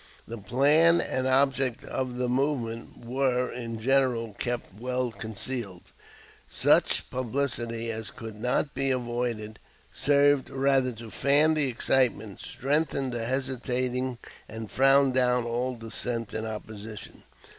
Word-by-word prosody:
The 115 Hz, 0 st, -6 dB
plan 150 Hz, -, +4 dB
and 130 Hz, 0 st, -1 dB
object 135 Hz, -2 st, +2 dB
of 130 Hz, -2 st, -3 dB
the 125 Hz, 0 st, 0 dB
movement 125 Hz, -3 st, -2 dB
were 125 Hz, 0 st, 0 dB
in 115 Hz, -2 st, -5 dB
general 125 Hz, -3 st, +1 dB
kept 120 Hz, -5 st, -3 dB
well 125 Hz, 0 st, -1 dB
concealed. 110 Hz, -2 st, -5 dB, 0.6 s
Such -, -, +2 dB
publicity 120 Hz, -2 st, -2 dB
as 110 Hz, -1 st, -5 dB
could 115 Hz, -1 st, -8 dB
not 125 Hz, +4 st, 0 dB
be 135 Hz, +1 st, +1 dB
avoided 120 Hz, -4 st, -2 dB, 0.3 s
served 145 Hz, -1 st, +3 dB
rather 135 Hz, -1 st, +2 dB
to 115 Hz, -1 st, -10 dB
fan 145 Hz, +3 st, +4 dB
the 150 Hz, -3 st, +2 dB
excitement, 120 Hz, -4 st, +1 dB
strengthen 135 Hz, 0 st, -1 dB
the 120 Hz, -2 st, -3 dB
hesitating, 130 Hz, 0 st, -1 dB, 0.3 s
and 110 Hz, -1 st, -7 dB
frown 135 Hz, 0 st, +4 dB
down 125 Hz, -1 st, +2 dB
all 120 Hz, +2 st, -2 dB
dissent 115 Hz, 0 st, -3 dB
and 110 Hz, +1 st, -3 dB
opposition. 110 Hz, -1 st, -8 dB
125 Hz, 125 wpm, -27 LUFS, 115-135 Hz, 0.6 s, plan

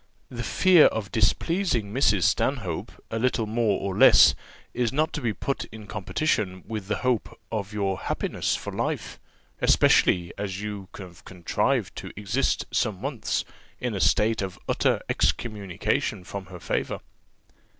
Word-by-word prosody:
The 120 Hz, -2 st, -5 dB
fear 180 Hz, +6 st, +5 dB
of 105 Hz, -4 st, -3 dB
displeasing 115 Hz, -, +1 dB
Mrs. 105 Hz, -8 st, +3 dB
Stanhope 100 Hz, -, 0 dB, 0.2 s
a 115 Hz, -, -1 dB
little 120 Hz, -1 st, +1 dB
more 110 Hz, -2 st, +1 dB
or 95 Hz, -1 st, -3 dB
less -, -, +8 dB, 0.4 s
is 120 Hz, -2 st, 0 dB
not 155 Hz, +4 st, 0 dB
to 150 Hz, -, -3 dB
be 120 Hz, -3 st, 0 dB
put 135 Hz, +6 st, -3 dB
in 110 Hz, -1 st, -11 dB
competition 95 Hz, -, -1 dB
with 105 Hz, -4 st, -5 dB
the 105 Hz, -, 0 dB
hope 125 Hz, -4 st, 0 dB
of 105 Hz, -2 st, -3 dB
your 100 Hz, -3 st, -1 dB
happiness -, -, -1 dB
for -, -, -6 dB
life, -, -, -3 dB, 0.4 s
especially 85 Hz, -1 st, +4 dB
as 100 Hz, -2 st, -3 dB
you 105 Hz, -2 st, -5 dB
have 90 Hz, -3 st, -11 dB
contrived 90 Hz, -3 st, -1 dB
to -, -, -7 dB
exist 105 Hz, +7 st, 0 dB
some 105 Hz, -6 st, 0 dB
months 135 Hz, +1 st, -2 dB, 0.3 s
in 125 Hz, -2 st, -2 dB
a 100 Hz, -, -3 dB
state 105 Hz, +6 st, +3 dB
of 95 Hz, -2 st, -4 dB
utter -, -, +1 dB
excommunication 100 Hz, -4 st, -1 dB
from 95 Hz, +1 st, -7 dB
her 90 Hz, -1 st, -10 dB
favour. 80 Hz, -, -2 dB
105 Hz, 150 wpm, -26 LUFS, 95-120 Hz, 0.4 s, less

